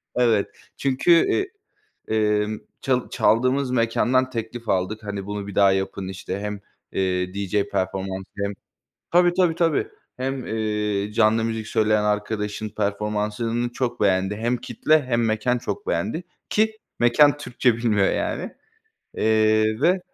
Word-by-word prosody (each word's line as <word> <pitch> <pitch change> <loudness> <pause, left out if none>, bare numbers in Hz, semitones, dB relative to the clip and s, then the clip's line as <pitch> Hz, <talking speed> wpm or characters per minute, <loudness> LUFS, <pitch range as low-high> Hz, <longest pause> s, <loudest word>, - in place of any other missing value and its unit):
Evet, 115 -5 +3 0.3
çünkü, 135 +4 +1
eee, 375 - +3 0.7
emm, 105 0 +1 0.2
çal 125 -2 0
çaldığımız 125 +5 +2
mekândan 125 +2 +2
teklif 115 0 -6
aldık, 95 +4 0
hani, 100 -2 -5
"Bunu 105 -1 -4
bir 100 - -7
daha 100 -1 +5
yapın." 95 0 -2
işte, 95 +1 -5
hem, 105 -1 -4 0.3
eee, 90 -1 -1
DJ 100 0 0
performansı 95 0 -3
hem 100 - -2 0.6
Tabii, 175 0 +5
tabii, 180 -3 +3
tabii. 170 - +1 0.3
Hem, 130 0 -3
eee, 105 -2 -1
canlı 110 0 +3
müzik 110 -1 -3
söyleyen 110 -1 +2
arkadaşın 105 0 -2
performansını 105 +3 -2
çok 120 -1 -2
beğendi. 95 0 +2
Hem 120 +3 0
kitle 150 +6 +1
hem 120 -3 0
mekân 115 +3 +1
çok 405 - -5
beğendi 180 - -1 0.3
ki 220 +1 +1 0.2
mekân 145 +5 +5
Türkçe 125 -4 0
bilmiyor, 110 -4 +2
yani. - - -2 0.7
Eee, 110 +1 +3
ve 180 +5 +4
110 Hz, 135 wpm, -23 LUFS, 105-125 Hz, 0.7 s, daha